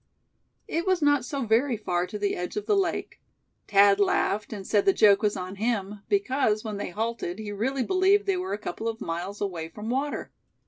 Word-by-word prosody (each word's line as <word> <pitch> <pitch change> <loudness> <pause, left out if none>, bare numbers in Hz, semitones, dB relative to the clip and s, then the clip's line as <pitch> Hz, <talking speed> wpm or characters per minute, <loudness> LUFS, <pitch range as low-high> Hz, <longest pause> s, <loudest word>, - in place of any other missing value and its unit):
It 335 +3 -2
was 370 -4 +2
not 290 -3 +4
so 275 -1 -3
very 230 +3 +2
far 180 -4 -1
to 210 - -6
the 205 -1 -1
edge 180 - -5
of 420 - -3
the 420 - +2
lake. 390 -2 -1 0.5
Thad 200 0 +5
laughed, 200 +1 +1
and 200 -3 -6
said 205 0 +2
the 195 - +5
joke 205 -1 +5
was 210 -1 +1
on 185 +2 -6
him; 210 -2 -2
because, 265 - +1
when 215 -3 -4
they 205 - -4
halted 220 -2 -3
he 215 -1 -6
really 255 +6 -1
believed 385 - +3
they 390 - +1
were 365 +1 -4
a - - -1
couple 220 +1 -5
of 225 -1 -3
miles 175 +5 -5
away 170 -5 -3
from 210 +6 -6
water. 280 +3 -2
215 Hz, 210 wpm, -26 LUFS, 200-275 Hz, 0.5 s, Thad